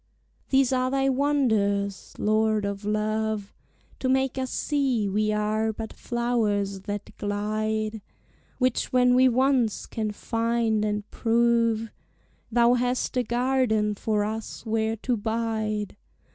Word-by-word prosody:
These 265 -1 +3
are 255 0 +1
thy 270 0 +1
wonders, 220 -8 0
Lord 215 0 +1
of 200 0 -4
love, 215 0 -1 0.5
To 260 - -1
make 265 0 +1
us 260 -1 -2
see 265 -9 0
we 215 +2 +1
are 215 +1 0
but 220 0 -7
flowers 215 -5 -1
that 205 0 -5
glide; 215 +1 -2 0.6
Which 255 -2 0
when 250 -1 +4
we 255 +1 +6
once 255 -3 +2
can 220 -1 -3
finde 225 0 0
and 210 0 -2
prove, 230 -1 +2 0.6
Thou 235 +1 +4
hast 250 +1 0
a 250 - +3
garden 240 -3 +1
for 210 0 0
us 220 +2 -5
where 220 0 0
to 240 +3 -1
bide. 220 -1 -2
220 Hz, 125 wpm, -26 LUFS, 210-250 Hz, 0.6 s, we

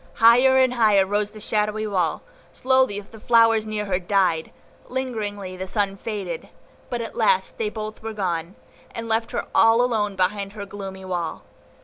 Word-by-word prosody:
Higher 250 +4 +6
and 260 -1 +4
higher 210 -5 +4
rose 205 +1 0
the 215 0 -12
shadowy 210 0 -1
wall, 185 -6 -1 0.3
slowly 260 -6 +1
the 220 +2 -15
flowers 225 -1 +4
near 210 -1 -2
her 185 -2 0
died, 180 -4 +1 0.4
lingeringly 210 -7 -4
the 190 +1 -6
sunlight 195 -1 -1
faded; 195 -7 -5 0.4
but 240 -1 -2
at 225 - -7
last 475 -1 +1
they 440 -2 0
both 215 - -7
were 225 0 -5
gone, 175 -3 -3 0.4
and 230 0 -5
left 225 0 0
her - - -3
all 225 0 +5
alone 220 -5 +1
behind 195 +2 -1
the 205 -2 -6
gloomy 195 -1 -8
wall. 175 -3 -3
210 Hz, 165 wpm, -23 LUFS, 195-230 Hz, 0.4 s, Higher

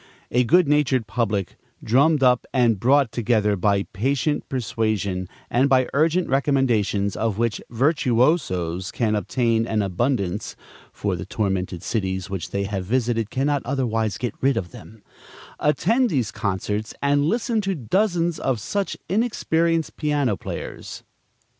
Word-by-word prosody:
A 125 +1 +3
good 175 +6 +4
natured 140 -5 +2
public, 105 -4 -2 0.3
drummed 140 +5 +3
up 125 -1 +3
and 120 -6 +2
brought 135 +2 +3
together 110 -3 +1
by 100 +1 +1
patient 135 +7 -1
persuasion 110 -7 -1 0.2
and 130 +3 +2
by 130 -1 +4
urgent 165 +5 +2
recommendations, 120 -8 +1
of 110 -3 -1
which 115 -1 -1
virtuosos 120 - +1
can 110 -3 0
obtain 115 +1 0
an 110 -2 0
abundance 100 0 -1 0.4
(for - - -2
the - - -7
tormented 95 -3 -2
cities 95 -3 -2
which 90 -3 -4
they 100 +1 -2
have 100 -1 -3
visited 115 +1 0
cannot 140 +2 0
otherwise 115 -6 -1
get 120 -4 -3
rid 135 -2 +2
of 90 -5 -3
them), 110 -2 -13 0.6
attend 220 - +2
these 125 - 0
concerts 105 +1 -3
and 145 0 +3
listen 225 +4 0
to 195 -1 -1
dozens 170 - 0
of 130 -4 -1
such 200 - -2
inexperienced 170 -6 0
piano 145 -7 +1
players. - - -7
120 Hz, 135 wpm, -23 LUFS, 105-145 Hz, 0.6 s, good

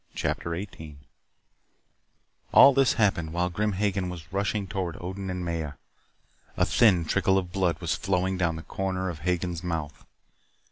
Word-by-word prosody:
CHAPTER 85 0 -2
18 80 -5 -8 1.6
All 140 - +9
this 135 -1 +4
happened 85 -7 +1
while 90 +1 0
Grim 105 +4 0
Hagen 95 -1 -1
was 85 -1 -9
rushing 100 +1 -1
toward 90 -4 -4
Odin 95 +2 -5
and 90 -1 -3
Maya. 80 -3 -3 0.8
A - - +3
thin 95 -8 +4
trickle 95 +3 +2
of 90 -2 -2
blood 90 -4 0
was 85 -3 -1
flowing 95 0 0
down 85 -3 0
the 80 - -7
corner 95 -1 -2
of 80 - -9
Hagen's 90 +1 -2
mouth. 80 -4 -4
90 Hz, 150 wpm, -27 LUFS, 85-95 Hz, 1.6 s, All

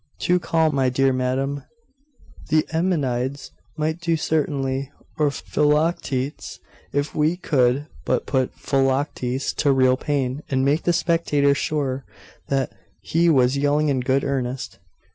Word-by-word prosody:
'Too 180 0 +2
calm, 160 -2 +1
my 135 -2 +2
dear 135 +1 +2
madam. 130 +2 -1 0.9
The 155 0 +3
Eumenides 140 -6 -1 0.3
might 155 +2 -1
do 170 -1 0
certainly, 140 -3 -1 0.3
or 150 -1 +4
Philoctetes, 150 -2 -1 0.3
if 145 +1 -1
we 155 +3 +1
could 135 -4 +1 0.2
but - - 0
put 130 -2 0
Philoctetes 135 -1 0
to 145 - +3
real 130 -1 +4
pain, 135 -1 -1
and 130 -1 +1
make 145 +4 +1
the 175 - +4
spectators 165 -4 +2
sure 135 -3 -1 0.4
that 135 -1 0 0.3
he 170 +1 +2
was 130 -3 +3
yelling 145 +1 +2
in 135 -2 +1
good 130 +2 +1
earnest. 130 -2 -3
140 Hz, 130 wpm, -23 LUFS, 130-155 Hz, 0.9 s, or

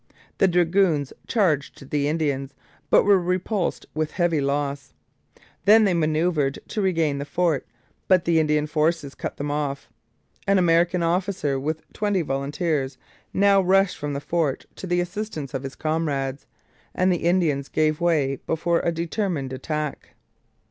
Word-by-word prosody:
The 195 - +5
dragoons 175 -4 +2
charged 150 - 0
the 145 -1 +1
Indians, 140 -3 -1 0.3
but - - +6
were 200 -1 +5
repulsed 180 +2 -1
with 155 -1 -2
heavy 175 -4 +1
loss. 140 - -2 0.7
Then 220 +2 +7
they 195 -3 +3
manoeuvred 155 -3 +1
to 215 - -2
regain 165 -7 +1
the - - -2
fort, 165 -1 0 0.4
but 185 -2 +4
the 165 -1 +3
Indian 150 -1 +2
forces 155 -1 0
cut - - -6
them 145 +1 -3
off. 145 -2 -3 0.6
An 195 0 +4
American 175 0 +3
officer, 170 -5 0
with 155 +3 -3
twenty 205 -4 0
volunteers, 140 0 -2 0.3
now 200 0 +4
rushed 190 +1 +3
from 145 0 -3
the 140 - -2
fort 155 -2 -1
to 190 - -6
the 175 0 +1
assistance 175 -6 -5
of 135 - -2
his 135 0 -7
comrades, 145 -4 -2 0.5
and 185 0 +3
the - - 0
Indians 160 -6 +1
gave 155 0 +1
way 150 -6 +2
before 170 +1 +1
a 170 - 0
determined 165 -4 -2
attack. 150 +2 -4
160 Hz, 150 wpm, -24 LUFS, 145-180 Hz, 0.7 s, Then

